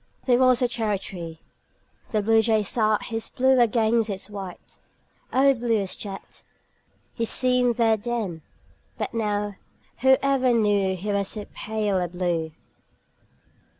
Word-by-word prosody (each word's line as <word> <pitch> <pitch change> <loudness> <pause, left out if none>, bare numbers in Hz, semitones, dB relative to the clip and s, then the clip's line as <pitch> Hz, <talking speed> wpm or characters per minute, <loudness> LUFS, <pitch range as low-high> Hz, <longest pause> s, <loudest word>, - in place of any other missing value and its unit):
There 245 -2 +3
was 255 -1 +4
a - - +4
cherry 220 -4 -1
tree. 170 -4 -8 0.7
The 215 -2 0
Bluejay 220 0 +3
sat 215 +1 +1
His 225 -1 -4
blue 260 0 +3
against 230 -1 +2
its 195 +1 -3
white 195 -3 -9 0.5
O 275 +2 +4
blue 235 -2 0
as 195 -2 -1
jet 195 -2 -8 0.7
He 230 - -3
seemed 250 +1 +3
there 225 -2 +3
then! 215 -7 -4 0.6
But - - -4
now 210 -2 -2 0.4
Whoever 265 0 +3
knew 205 -4 +2
He 205 +4 -3
was 200 -1 0
so 210 0 -4
pale 210 -3 -1
a 180 - -1
blue! 170 -2 -2
220 Hz, 135 wpm, -24 LUFS, 200-240 Hz, 0.7 s, was